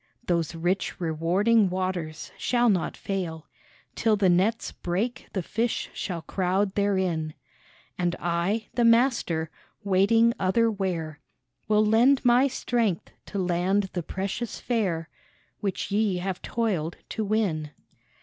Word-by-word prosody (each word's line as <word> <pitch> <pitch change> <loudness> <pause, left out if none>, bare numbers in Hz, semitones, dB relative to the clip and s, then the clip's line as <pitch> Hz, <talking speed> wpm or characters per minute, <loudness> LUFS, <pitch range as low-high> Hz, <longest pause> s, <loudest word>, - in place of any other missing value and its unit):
" - - -45
Those 170 -1 0
rich, 175 +4 -1
rewarding 185 +6 +2
waters 180 -4 -3
shall 240 -1 +2
not 185 -5 0
fail, 170 -5 -4 0.5
Till 220 -2 +2
the 195 -2 +3
nets 195 +6 +2
break 215 +8 -3
the 190 - -1
fish 225 +6 -2
shall 170 -4 -4
crowd 190 +3 0
therein; 185 -6 0 0.6
And 175 -1 +1
I, 175 +6 -1
the 240 - +1
Master, 230 - +3 0.3
waiting 205 +4 +4
other 225 +5 +2
where, 170 -7 -3 0.5
Will 215 0 +4
lend 245 +6 +4
My 245 +3 +5
strength 235 -8 -1 0.2
to 200 - -5
land 185 +2 +1
the 175 - -1
precious 195 +7 -4
fare 190 -10 -1 0.5
Which 200 -1 -3
ye 205 -2 +2
have 185 0 -3
toiled 190 -9 -1
to 220 - -2
win." 195 -8 0
195 Hz, 130 wpm, -26 LUFS, 175-225 Hz, 0.6 s, My